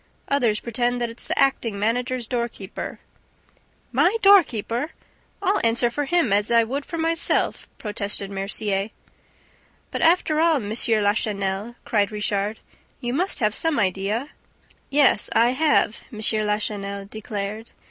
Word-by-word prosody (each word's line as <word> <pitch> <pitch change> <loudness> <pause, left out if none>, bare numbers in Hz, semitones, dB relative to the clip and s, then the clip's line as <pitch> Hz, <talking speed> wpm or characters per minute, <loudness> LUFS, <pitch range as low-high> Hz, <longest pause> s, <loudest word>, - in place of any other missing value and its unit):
Others 240 -7 +2
pretend 245 +1 0
that 240 -1 -2
it's 230 - -3
the - - -2
acting 235 -6 +1
manager's 245 +4 -1
doorkeeper 235 -5 -4 0.5
..." - - -37
"My 385 +6 +3
doorkeeper? 295 - +4 0.5
I'll 395 +1 +2
answer 235 +1 +2
for 290 +4 -2
him 315 - +2
as 205 +1 +2
I 235 -1 +5
would 275 +5 -4
for 335 - -5
myself!" 330 0 +1
protested 205 -2 -4
Mercier. 195 +1 -1 1.0
"But, - - -3
after 325 -2 +3
all, 330 0 +4
M. 210 -7 -3
Lachenel," 210 -1 0
cried 205 -2 +1
Richard, 210 0 -1 0.4
"you 240 -1 -3
must 365 +7 0
have 210 -1 +2
some 325 +2 0
idea." 205 +7 -1 0.6
"Yes, 275 -7 +3
I 235 +1 +4
have," 285 -5 +2
M. 220 - -9 0.3
Lachenel 200 -1 -2
declared. 215 +1 -5
230 Hz, 135 wpm, -23 LUFS, 205-275 Hz, 1.0 s, I